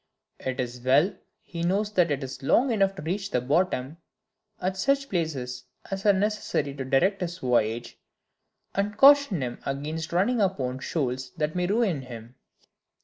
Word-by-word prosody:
It 130 -1 -4
is 125 -1 -3
well 140 +10 +3 0.3
he 170 -2 -7
knows 200 +5 0
that 180 -4 +3
it 140 -1 -1
is 130 +1 -7
long 245 - +3
enough 195 -3 +2
to 190 - -8
reach 195 +5 -2
the 125 - +1
bottom, 145 +1 0 0.6
at 185 +1 -1
such 275 +7 +1
places 135 -8 -3 0.3
as 195 +2 -2
are - - +8
necessary 195 -8 -1
to 135 -1 -5
direct 160 +10 +2
his 175 0 -3
voyage, 120 -4 0 0.7
and 205 +1 -1
caution 275 - +6
him 120 -1 -5
against 155 +4 -4
running 205 +7 +2
upon 130 -10 -1
shoals 130 -4 -2
that 155 0 -1
may 180 0 0
ruin 200 - +1
him. 120 -2 -10
165 Hz, 160 wpm, -26 LUFS, 130-195 Hz, 0.7 s, are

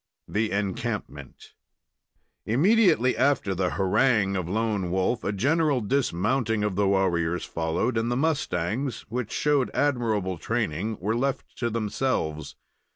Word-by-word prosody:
THE 110 +1 0
ENCAMPMENT 95 -8 -4 0.9
Immediately 160 - +4
after 130 -6 +1
the 90 0 0
harangue 100 - +2
of 90 -3 -2
Lone 105 -3 -1
Wolf 95 +6 0
a 100 - -1
general 140 - +2
dismounting 110 -1 0
of 105 -3 -1
the 100 0 +2
warriors 90 -3 +1
followed, 85 +9 -1
and 115 +1 -1
the 120 - 0
mustangs, 130 - -1
which 120 -1 -3
showed 145 -3 +1
admirable 110 - 0
training, 95 +11 -2
were 105 +5 -1
left 135 +3 -2
to 120 - -1
themselves. 105 - -2
110 Hz, 125 wpm, -26 LUFS, 95-130 Hz, 0.9 s, Immediately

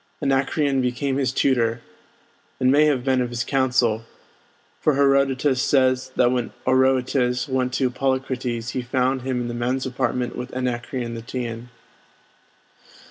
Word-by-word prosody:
Anacreon 140 0 +1
became 130 +2 -1
his 135 -2 +1
tutor, 115 -3 +1 0.8
and 130 0 +3
may 150 +2 +5
have 140 -5 +1
been 130 -1 +2
of 125 - -1
his 120 -2 -2
council; 125 -4 +1 0.8
for 155 - +2
Herodotus 135 -1 +2
says 130 -2 +2
that 120 0 +3
when 125 -2 -2
Oroetes 130 -1 +2
went 130 -2 0
to 130 0 +1
see - - -13
Polycrates 125 -2 -2
he 130 - -2
found 130 +1 0
him 130 -1 -2
in 120 - -3
the 120 - -4
men's 125 +2 -1
apartment 125 -1 -2
with 125 +1 -7
Anacreon 125 -1 -3
the 115 - -6
Teian. 115 0 -5
130 Hz, 145 wpm, -23 LUFS, 125-135 Hz, 0.8 s, may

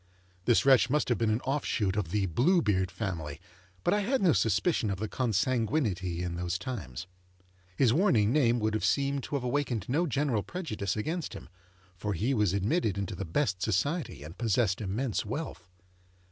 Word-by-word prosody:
This 120 +2 +4
wretch 135 -2 +6
must 150 0 +1
have 120 - +1
been 115 -2 +2
an 110 +3 +1
off 140 +2 -1
shoot 100 -3 0
of 105 -6 -1
the 100 +2 +1
Blue 140 - +3
Beard 95 -3 +1
family, 80 -9 -4 0.4
but - - +2
I 205 - +2
had 250 +7 +1
no 180 -4 +4
suspicion 160 - +1
of 100 - -2
the 110 +3 -3
consanguinity 110 - 0
in 85 -1 -3
those 90 0 -2
times. 90 - -6 0.7
His 120 -1 +4
warning 125 - +3
name 120 -5 +3
would 110 0 0
seem 140 0 +1
to 145 - -5
have 135 - -1
awakened 125 -5 -1
no 160 +7 +1
general 140 -6 0
prejudice 105 - -4
against 160 +9 -3
him, - - -10 0.5
for 105 +4 -3
he 110 +10 0
was 105 -6 +2
admitted 100 - 0
into 100 -2 -3
the 100 - -5
best 95 - 0
society 140 - -1
and 80 +3 -10
possessed 110 -3 +1
immense 110 +4 -1
wealth. 110 - -5
110 Hz, 180 wpm, -29 LUFS, 95-140 Hz, 0.7 s, wretch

